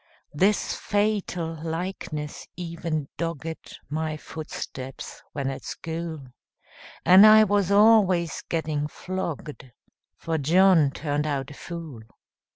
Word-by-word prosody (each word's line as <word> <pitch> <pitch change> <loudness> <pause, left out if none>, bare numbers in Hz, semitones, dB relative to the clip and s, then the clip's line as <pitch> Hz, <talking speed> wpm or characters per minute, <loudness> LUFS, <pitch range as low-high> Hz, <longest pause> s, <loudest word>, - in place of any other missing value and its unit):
This 195 +7 +2
fatal 200 -6 -1
likeness 160 -3 -5
even 165 -4 -3
dogged 165 -1 -5
My 155 +1 -3
footsteps 135 -4 -7
when 140 -2 -2
at 135 - -7
school, 160 -3 -5 0.8
And 185 +3 +9
I 215 0 +8
was 200 -2 +1
always 200 -5 +4
getting 155 -3 -1
flogged, 155 -6 -6 0.5
For 165 -1 -2
John 170 +1 +5
turned 145 +1 -2
out 140 -2 -2
a - - -9
fool. 160 -6 -8
165 Hz, 105 wpm, -25 LUFS, 150-185 Hz, 0.8 s, And